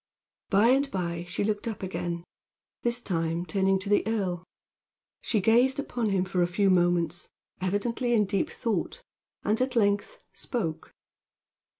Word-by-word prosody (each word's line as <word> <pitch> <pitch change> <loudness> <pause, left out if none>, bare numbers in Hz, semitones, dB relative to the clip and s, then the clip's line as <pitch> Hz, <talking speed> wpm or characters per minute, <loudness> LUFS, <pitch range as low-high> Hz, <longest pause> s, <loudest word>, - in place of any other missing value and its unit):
By 205 +4 +5
and 275 +2 +3
by 170 -4 -3
she 180 - -2
looked 210 +1 -1
up 220 -4 -4
again, 175 -2 -3 0.6
this 240 0 +1
time 165 -5 -1
turning 190 +3 +2
to 190 +1 -5
the 205 0 +4
earl. 190 -6 -1 0.8
She 220 - +1
gazed 240 +6 +4
upon 240 -5 -1
him 190 -2 +1
for 185 -1 0
a 175 - +3
few 195 +2 +2
moments, 175 -1 +1 0.3
evidently 230 +6 0
in 210 -2 +4
deep 195 0 0
thought, 235 - -3 0.4
and 215 +4 +1
at 255 0 0
length 205 - +1 0.2
spoke. 170 -11 -3
200 Hz, 145 wpm, -28 LUFS, 180-230 Hz, 0.8 s, By